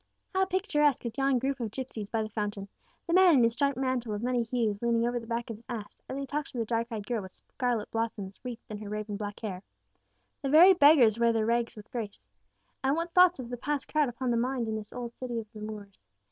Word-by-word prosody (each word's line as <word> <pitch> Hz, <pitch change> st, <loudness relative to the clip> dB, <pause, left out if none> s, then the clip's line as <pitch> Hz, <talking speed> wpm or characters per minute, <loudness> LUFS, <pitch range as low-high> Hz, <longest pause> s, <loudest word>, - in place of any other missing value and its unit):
How 380 Hz, 0 st, +3 dB
picturesque 330 Hz, -, +1 dB
is 230 Hz, -1 st, -4 dB
yon 270 Hz, -1 st, +2 dB
group 270 Hz, +2 st, -1 dB
of 230 Hz, -3 st, -2 dB
gipsies 220 Hz, -3 st, -5 dB
by 225 Hz, 0 st, 0 dB
the 215 Hz, -, -5 dB
fountain 205 Hz, -2 st, -3 dB, 0.4 s
the 335 Hz, -, -2 dB
man 365 Hz, -3 st, +7 dB
in 250 Hz, -, +5 dB
his 230 Hz, 0 st, +3 dB
striped 280 Hz, +1 st, +1 dB
mantle 255 Hz, -4 st, -1 dB
of 205 Hz, -, -5 dB
many 250 Hz, 0 st, +1 dB
hues 230 Hz, -3 st, -1 dB
leaning 235 Hz, -1 st, +2 dB
over 240 Hz, 0 st, -1 dB
the 230 Hz, -, -11 dB
back 235 Hz, 0 st, -3 dB
of 220 Hz, -, -6 dB
his 225 Hz, -, -20 dB
ass, 220 Hz, -4 st, -6 dB
as 265 Hz, -, -4 dB
he 275 Hz, -, -3 dB
talks 295 Hz, +2 st, -3 dB
to -, -, -8 dB
the 230 Hz, -, 0 dB
dark 230 Hz, +1 st, -1 dB
eyed 215 Hz, -4 st, -5 dB
girl 235 Hz, -2 st, -1 dB
with 190 Hz, -1 st, -9 dB
scarlet 245 Hz, -4 st, -3 dB
blossoms 220 Hz, -4 st, -3 dB
wreathed 245 Hz, -3 st, -7 dB
in 210 Hz, -, -5 dB
her 210 Hz, -1 st, -7 dB
raven 210 Hz, 0 st, -4 dB
black 205 Hz, 0 st, -6 dB
hair! 190 Hz, -5 st, -4 dB, 0.8 s
The 275 Hz, -, -2 dB
very 340 Hz, +6 st, +9 dB
beggars 285 Hz, -, +6 dB
wear 235 Hz, 0 st, +4 dB
their 225 Hz, -1 st, +1 dB
rags 235 Hz, +1 st, 0 dB
with 210 Hz, 0 st, -12 dB
grace! 210 Hz, -, -5 dB, 0.6 s
And 270 Hz, +2 st, +2 dB
what 335 Hz, +1 st, -3 dB
thoughts 360 Hz, -1 st, +6 dB
of 250 Hz, -3 st, -7 dB
the 245 Hz, -, -3 dB
past 290 Hz, +3 st, -2 dB
crowd 300 Hz, -3 st, +2 dB
upon 245 Hz, +1 st, -2 dB
the 235 Hz, -, +2 dB
mind 245 Hz, 0 st, 0 dB
in 220 Hz, -, -2 dB
this 215 Hz, -1 st, -6 dB
old 240 Hz, -1 st, -6 dB
city 245 Hz, -2 st, -4 dB
of 225 Hz, -, -6 dB
the 215 Hz, -, -9 dB
Moors! 210 Hz, -, -8 dB
235 Hz, 250 wpm, -29 LUFS, 215-270 Hz, 0.8 s, very